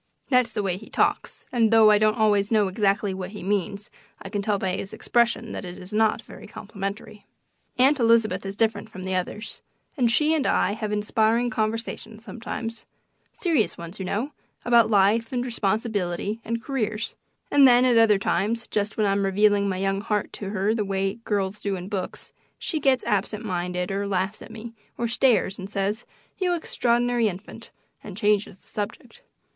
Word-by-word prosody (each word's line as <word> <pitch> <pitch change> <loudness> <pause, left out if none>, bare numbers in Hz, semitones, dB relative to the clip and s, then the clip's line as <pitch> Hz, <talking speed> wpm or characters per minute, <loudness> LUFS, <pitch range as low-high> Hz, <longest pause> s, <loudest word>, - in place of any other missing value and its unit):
That's 250 -3 +3
the 210 - -2
way 185 -2 -1
he 215 - -13
talks, - - 0
and 230 -3 +3
though 220 -1 +7
I 210 - +5
don't 215 +1 +3
always 205 -2 +3
know 215 -3 +4
exactly 200 0 +1
what 190 +1 -6
he 205 - -8
means 200 +1 -2 0.3
I 195 - -8
can 205 0 -2
tell 205 0 0
by 185 -1 -1
his 195 - -6
expression 235 -1 +1
that - - -5
it 180 0 -8
is 190 +2 -11
not 215 0 +2
very - - -12
complimentary. 200 +1 -7 0.5
Aunt 270 +3 +4
Elizabeth 225 -5 +3
is 195 0 -5
different 220 0 0
from 185 -4 -9
the 190 0 -3
others, 185 +4 -3 0.3
and 250 -6 +2
she 300 +6 +3
and 300 -4 +1
I - - +2
have 215 0 -3
inspiring 220 +3 +1
conversations 220 0 -3
sometimes 230 +1 -6 0.4
serious 315 - 0
ones, 170 +3 -9
you 190 - -3
know, 225 +10 -2 0.3
about 235 -2 +5
life 215 +2 +3
and 245 -1 -1
responsibility 210 -3 -1
and 230 0 -3
careers; 220 -6 -2 0.4
and 280 -2 +7
then, 245 0 +6
at 240 -2 +5
other 220 -3 +5
times, 220 +4 -1
just 210 +1 -2
when 215 - +2
I'm 200 0 +1
revealing 200 +1 +3
my 185 - -2
young 195 +1 0
heart 210 -1 -2
to 200 - -5
her 205 +1 0
the 220 -2 0
way 195 +2 -2
girls 200 -1 -1
do 200 -1 -2
in 180 +1 -7
books, 195 -3 -5 0.2
she 320 - -2
gets 265 -3 +2
absent 210 0 -1
minded 180 -1 -2
or 200 +1 -2
laughs 195 +1 -1
at - - -10
me, 225 +1 -9 0.2
or 235 - -1
stares 230 -5 +2
and 190 +1 -6
says, 205 +2 -2 0.3
"You 360 -2 +1
extraordinary 240 -6 +1
infant," 210 +4 -7 0.3
and 200 -3 -9
changes 210 -2 +1
the - - -29
subject. 210 -2 -6
210 Hz, 185 wpm, -25 LUFS, 195-230 Hz, 0.5 s, though